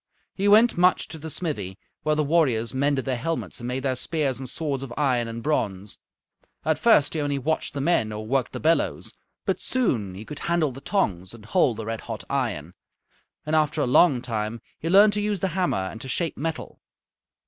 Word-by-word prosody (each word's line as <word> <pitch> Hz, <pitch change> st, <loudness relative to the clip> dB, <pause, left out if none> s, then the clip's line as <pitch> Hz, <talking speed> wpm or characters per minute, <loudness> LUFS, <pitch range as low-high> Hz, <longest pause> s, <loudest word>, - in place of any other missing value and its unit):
He 200 Hz, +1 st, -1 dB
went 215 Hz, -1 st, +5 dB
much 180 Hz, +1 st, +4 dB
to 160 Hz, -, -8 dB
the 160 Hz, +2 st, -7 dB
smithy, 105 Hz, -, -4 dB, 0.2 s
where 155 Hz, 0 st, +1 dB
the 150 Hz, -, +1 dB
warriors 135 Hz, -8 st, +2 dB
mended 140 Hz, 0 st, +1 dB
their 130 Hz, -2 st, -1 dB
helmets 165 Hz, +3 st, -3 dB
and 120 Hz, -, -5 dB
made 125 Hz, +1 st, -3 dB
their 130 Hz, -2 st, 0 dB
spears 140 Hz, -1 st, -1 dB
and 130 Hz, -2 st, -4 dB
swords 145 Hz, -3 st, -2 dB
of 135 Hz, -3 st, -7 dB
iron 125 Hz, -5 st, +1 dB
and 115 Hz, 0 st, -6 dB
bronze. 105 Hz, -9 st, -2 dB, 0.7 s
At 155 Hz, -1 st, +1 dB
first 220 Hz, -11 st, +4 dB
he 155 Hz, -, -1 dB
only 145 Hz, -1 st, -1 dB
watched 150 Hz, +2 st, -2 dB
the 140 Hz, -, -2 dB
men 135 Hz, -9 st, +2 dB
or 105 Hz, 0 st, -5 dB
worked 130 Hz, +2 st, 0 dB
the -, -, -5 dB
bellows, 165 Hz, +1 st, +1 dB, 0.3 s
but -, -, -1 dB
soon 115 Hz, -, 0 dB
he 105 Hz, +4 st, -8 dB
could 150 Hz, -, -7 dB
handle 170 Hz, -4 st, +1 dB
the 135 Hz, +2 st, -10 dB
tongs 95 Hz, -, -1 dB
and 110 Hz, -3 st, -14 dB
hold 125 Hz, -, +2 dB
the 110 Hz, -, -5 dB
red 115 Hz, 0 st, -4 dB
hot 110 Hz, -3 st, -6 dB
iron, 105 Hz, -, -2 dB, 0.7 s
and 155 Hz, +1 st, 0 dB
after 155 Hz, 0 st, +2 dB
a -, -, +2 dB
long 130 Hz, 0 st, +4 dB
time 110 Hz, -1 st, -3 dB, 0.2 s
he 165 Hz, -, -3 dB
learned 205 Hz, +3 st, +7 dB
to 210 Hz, -, -1 dB
use 205 Hz, -1 st, -1 dB
the 190 Hz, -, 0 dB
hammer 180 Hz, -, 0 dB
and 95 Hz, +4 st, -4 dB
to 130 Hz, -, -7 dB
shape 165 Hz, +5 st, -1 dB
metal. 160 Hz, +2 st, -4 dB
140 Hz, 210 wpm, -25 LUFS, 115-165 Hz, 0.7 s, learned